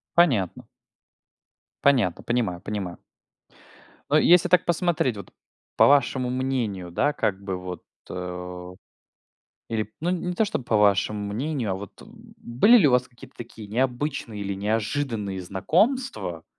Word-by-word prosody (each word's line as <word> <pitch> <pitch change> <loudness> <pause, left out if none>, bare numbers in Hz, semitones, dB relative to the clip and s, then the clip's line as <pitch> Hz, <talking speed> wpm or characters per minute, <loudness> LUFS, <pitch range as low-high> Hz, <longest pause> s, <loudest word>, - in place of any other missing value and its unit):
Понятно. 125 - +2 1.2
Понятно, 120 -11 +3
понимаю 115 -8 -1
понимаю. 95 -3 -5 1.1
Но 150 - +4
если 175 +3 +5
так 180 0 +4
посмотреть, 170 -8 0
вот, 100 - -9 0.5
по - - +6
вашему 130 -2 +3
мнению, 125 -8 -2
да, 145 +12 +1
как 100 -8 -1
бы, 95 -2 -3
вот, 90 -2 -7 0.3
э, 90 0 -6 1.0
или, 110 -2 -2
ну, 170 - 0
не 180 -1 -2
не 180 - -1
то 220 +5 +2
чтобы 165 - -3
по 110 - +2
вашему 100 0 +2
мнению, 130 -2 -2
а - - 0
вот, 100 +2 -10
э, - - -12
были 220 - +2
ли 180 -10 +5
у - - +3
вас 125 0 +2
какие-то 120 -1 -16
такие 115 -2 -10
необычные 125 -1 -2
или 100 0 -3
неожиданные 105 0 -2
знакомства 155 - 0
115 Hz, 140 wpm, -25 LUFS, 100-145 Hz, 1.2 s, по